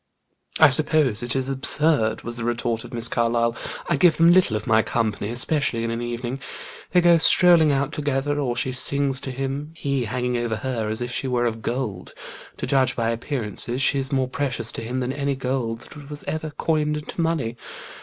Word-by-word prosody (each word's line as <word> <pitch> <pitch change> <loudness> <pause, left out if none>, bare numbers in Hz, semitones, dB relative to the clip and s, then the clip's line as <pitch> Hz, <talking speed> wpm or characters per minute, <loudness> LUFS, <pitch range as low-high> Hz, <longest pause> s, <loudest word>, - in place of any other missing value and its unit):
"I 155 - +8
suppose 140 -5 +3
it 120 +1 -2
is 135 0 0
absurd," 135 -4 +1
was 120 0 -5
the 115 - -5
retort 120 -1 -1
of - - -11
Miss 120 -1 +2
Carlyle. 115 0 +1 0.3
"I 170 - +1
give 170 +3 +4
them 165 +1 +6
little 175 -11 +4
of 105 - -7
my 110 0 +4
company, 110 -3 -2
especially 125 0 -1
in 115 - -2
an 115 +1 -3
evening. 120 +2 -4 0.5
They 180 - +3
go 170 -1 +5
strolling 170 -2 +5
out 140 +1 0
together, 145 -1 -1
or 125 -4 -1
she 130 +2 -1
sings 135 +1 +2
to - - -5
him, 135 +4 -4
he 140 -5 -1
hanging 125 +2 -2
over 120 -1 -1
her 115 -3 -3
as 110 +3 -2
if 120 - -5
she 130 - -1
were 125 -1 0
of 115 -1 -2
gold: 115 -7 -4 0.4
to - - -4
judge 135 -2 +2
by 115 -1 0
appearances, 120 0 -3
she 140 - +2
is 135 -1 -3
more 130 -2 +1
precious 125 -4 -2
to - - -6
him 125 +3 -3
than 125 +1 -2
any 140 -1 -1
gold 125 -3 -3
that 145 +3 -12
was 150 0 -7
ever 155 +1 -4
coined 150 -1 -1
into 150 +3 -5
money. 160 -9 -1
130 Hz, 205 wpm, -23 LUFS, 120-145 Hz, 0.5 s, I